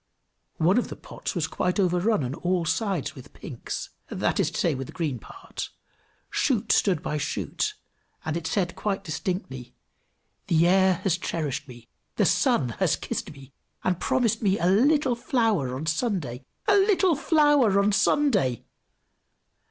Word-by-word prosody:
One 180 +8 +4
of - - -2
the - - -7
pots - - -7
was - - 0
quite 180 +3 -1
overrun 180 0 +2
on 125 +1 -3
all 175 +2 -1
sides 185 - -1
with 130 - -13
pinks, - - -6 0.2
that - - -1
is - - +2
to - - -6
say, - - +2
with 130 -1 -5
the - - -11
green 150 -8 -2
part; 385 - -8 0.6
shoot 230 -6 +1
stood 185 -7 +2
by 150 - -2
shoot, 420 - -2 0.5
and 160 0 -2
it 170 -1 -3
said 175 0 -1
quite 195 -2 -2
distinctly, 145 -6 -4 0.7
"The 165 0 +4
air 190 +1 +5
has 175 -3 +1
cherished 150 -5 -3
me, 120 -2 -13 0.3
the - - +2
sun 235 - +2
has 175 -5 +3
kissed 215 -2 -4
me, 135 -2 -14 0.3
and 180 -1 0
promised 230 -3 +1
me 200 -2 +2
a 170 - -1
little 260 - +4
flower 225 - 0
on 140 +4 -4
Sunday! 160 - -2 0.2
a 410 - +5
little 385 -3 +4
flower 290 - +4
on 200 +1 +3
Sunday!" 200 - +2
185 Hz, 160 wpm, -26 LUFS, 150-230 Hz, 0.7 s, air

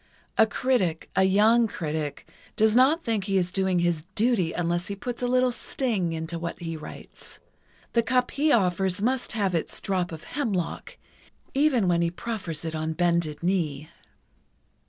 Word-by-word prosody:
A 220 - +5
critic—a 190 -8 0
young 220 +5 +4
critic—does 160 +6 -2
not 285 +7 +4
think 220 -5 -1
he 195 -2 +1
is 180 -1 0
doing 190 -1 +1
his 170 -2 0
duty 215 -7 +2
unless 175 +1 -1
he 200 - -4
puts 240 +5 -5
a 245 - 0
little 255 0 +3
sting 225 -8 -1
into 165 +1 -4
what 170 0 -4
he 165 -1 -5
writes. 155 -1 -10 0.6
The 235 - +4
cup 250 +2 +1
he 300 +2 +1
offers 190 -4 +2
must 250 +4 -1
have 200 -4 0
its 165 - -2
drop 185 -3 -1
of 160 -1 -8
hemlock, 205 - -3 0.6
even 270 -8 +3
when 170 -1 +2
he 170 - +2
proffers 175 -5 -5
it 160 - -3
on 160 0 -2
bended 170 -2 0
knee." 155 -5 -1
190 Hz, 155 wpm, -26 LUFS, 170-235 Hz, 0.6 s, A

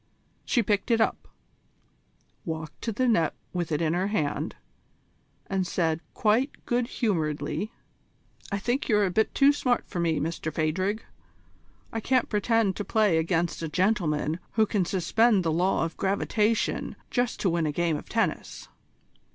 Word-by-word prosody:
She 240 - +2
picked 205 +2 0
it 230 -1 +3
up, 220 - 0 1.2
walked 160 -2 -6
to 230 - -2
the 255 +4 0
net 170 -10 +2 0.2
with 175 -2 -2
it 150 +2 +1
in 160 0 +1
her 185 +2 0
hand, 155 -9 -1 0.9
and 190 -2 -1
said 165 -2 0 0.2
quite 230 +6 +1
good 240 0 0
humouredly: 195 - -1 0.8
"I 200 - 0
think 240 +8 -1
you're 210 -2 +4
a 185 - -1
bit 220 +4 +1
too 280 +1 +6
smart 250 -4 0
for 175 - -4
me, 165 -3 +1
Mr 155 +1 -3
Phadrig. 185 +8 -1 0.9
I 225 - -1
can't 255 +2 +1
pretend 215 -2 +2
to - - -2
play 205 -5 +3
against 165 +1 0
a 165 - -3
gentleman 165 -4 +1
who 220 +1 +4
can 200 -3 0
suspend 200 +3 +2
the 165 - +1
law 175 +1 +2
of 165 - -6
gravitation 210 +3 0 0.2
just 245 -1 0
to 190 - +2
win 165 -2 +1
a - - 0
game 170 +1 0
of - - -7
tennis." - - -2
190 Hz, 160 wpm, -27 LUFS, 165-220 Hz, 1.2 s, too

